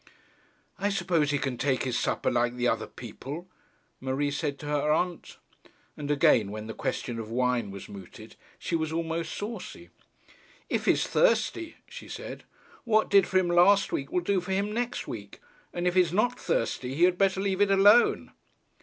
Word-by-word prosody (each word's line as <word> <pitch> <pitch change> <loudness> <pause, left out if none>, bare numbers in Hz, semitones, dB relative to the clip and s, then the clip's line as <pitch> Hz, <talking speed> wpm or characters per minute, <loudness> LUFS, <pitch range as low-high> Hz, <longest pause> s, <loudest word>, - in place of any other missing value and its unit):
'I 200 +2 +1
suppose 170 -6 +1
he 145 - +1
can 130 -3 -3
take 135 -2 +1
his 125 -2 -2
supper - - 0
like 120 0 +1
the 125 0 0
other - - 0
people,' 155 +7 -8 0.5
Marie 135 +2 -1
said 140 0 -2
to 150 - -10
her 150 0 0
aunt. 175 +2 -1 0.6
And 145 -1 -6
again, 120 -7 +4
when 105 +1 -6
the 110 - -6
question 120 -2 -3
of 110 -1 -6
wine 125 -2 0
was 100 0 -9
mooted, 95 -3 -11 0.2
she - - -3
was 160 -1 -1
almost 165 0 -2
saucy. 220 +3 -7 0.8
'If - - -1
he's - - +3
thirsty,' 345 -9 +1
she - - -10
said, - - -8 0.4
'what 220 -2 +2
did 200 -1 +6
for 190 - +1
him 185 -2 +2
last 185 +4 +5
week, 140 - -3
will 180 - +1
do 190 +1 +1
for 190 +2 -3
him 200 +2 -1
next 245 +2 -3
week: - - -8 0.3
and 175 0 -3
if 180 - +2
he's 180 -3 +3
not 240 +6 +1
thirsty, 125 +3 -1
he 165 - +2
had 180 0 +4
better 195 -1 +2
leave 195 0 0
it 205 - +4
alone.' 205 +4 +5
165 Hz, 180 wpm, -28 LUFS, 130-195 Hz, 0.8 s, did